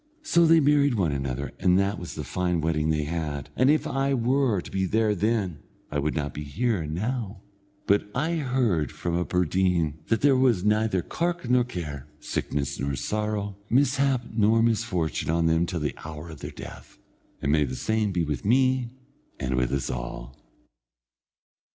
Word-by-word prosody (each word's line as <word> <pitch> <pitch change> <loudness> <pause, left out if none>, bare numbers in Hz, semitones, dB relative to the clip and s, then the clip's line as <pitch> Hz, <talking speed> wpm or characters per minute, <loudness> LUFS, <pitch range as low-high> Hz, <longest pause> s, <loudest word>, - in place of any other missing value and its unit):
So 170 - +4
they 165 0 +6
married 145 -2 +3
one 90 -7 +1
another, 70 0 -3
and 90 -1 +4
that 100 +1 +1
was 90 - -7
the 75 - -4
fine 90 +5 -1
wedding 80 -1 0
they 75 -1 +1
had, 75 -3 -4
and 130 +2 +4
if 155 +1 +3
I 135 0 0
were 125 -3 +2
to - - -9
be 95 0 0
there 110 +1 +2
then, 100 -5 0 0.3
I 75 - 0
would 75 +2 -1
not 75 -2 -2
be 75 - -5
here 95 - -1
now; 105 +6 -3 0.4
but 100 +1 +2
I 160 +6 0
heard 125 - +1
it - - -15
from 85 - -3
a 90 - +1
bird_een_ 90 -3 +1
that 115 - +1
there 140 -1 +5
was 125 -7 +3
neither 105 -3 +2
cark 170 - -2
nor 125 0 +4
care, 75 - -6
sickness 70 -2 -3
nor 70 0 -1
sorrow, 105 - -2
mishap 135 0 +2
nor 110 +1 +4
misfortune 90 -10 0
on 85 +1 +2
them 80 +1 +2
till 85 - -3
the 75 -3 -1
hour 80 +1 -7
of 80 - -11
their - - -6
death, - - -11 0.4
and 70 - 0
may 75 0 +4
the 65 -2 -3
same 110 - 0
be 90 -2 0
with 75 -2 -3
me, 130 +2 +2 0.5
and 65 0 -2
with 65 -1 0
us 70 -2 -1
all! - - -6
95 Hz, 180 wpm, -26 LUFS, 75-120 Hz, 0.5 s, they